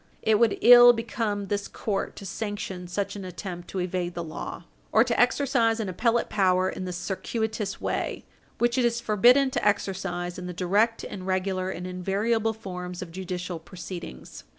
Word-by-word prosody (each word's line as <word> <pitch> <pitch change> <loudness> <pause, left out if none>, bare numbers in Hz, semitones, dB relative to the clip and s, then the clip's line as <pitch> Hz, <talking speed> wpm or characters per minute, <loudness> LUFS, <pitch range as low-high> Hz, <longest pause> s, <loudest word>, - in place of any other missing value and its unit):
It 220 -1 +3
would 230 -3 +3
ill 245 0 +10
become 225 -3 -2
this 200 +1 -2
court 200 -3 -3
to 200 - -9
sanction 195 -2 -5
such 200 +3 -3
an 200 - -6
attempt 180 -1 -7
to - - -6
evade 180 -1 -2
the 170 - -3
law, 160 +1 -6 0.3
or 220 - +6
to 240 -1 -1
exercise 245 -3 +3
an 210 -4 -2
appellate 230 +5 +1
power 185 -2 +2
in 185 - -5
this 180 -1 -4
circuitous 215 +3 -3
way - - -3 0.3
which 240 +2 +2
it - - +3
is 235 0 +1
forbidden 240 +5 +4
to - - -2
exercise 190 -3 -1
in 180 - -6
the 180 - -5
direct 200 +6 +1
and 185 -1 -7
regular 185 0 -1
and 180 -1 -5
invariable 205 +5 0
forms 180 -4 -6
of 170 - -11
judicial 180 -1 -5
proceedings. 175 - -9
195 Hz, 175 wpm, -26 LUFS, 180-225 Hz, 0.3 s, ill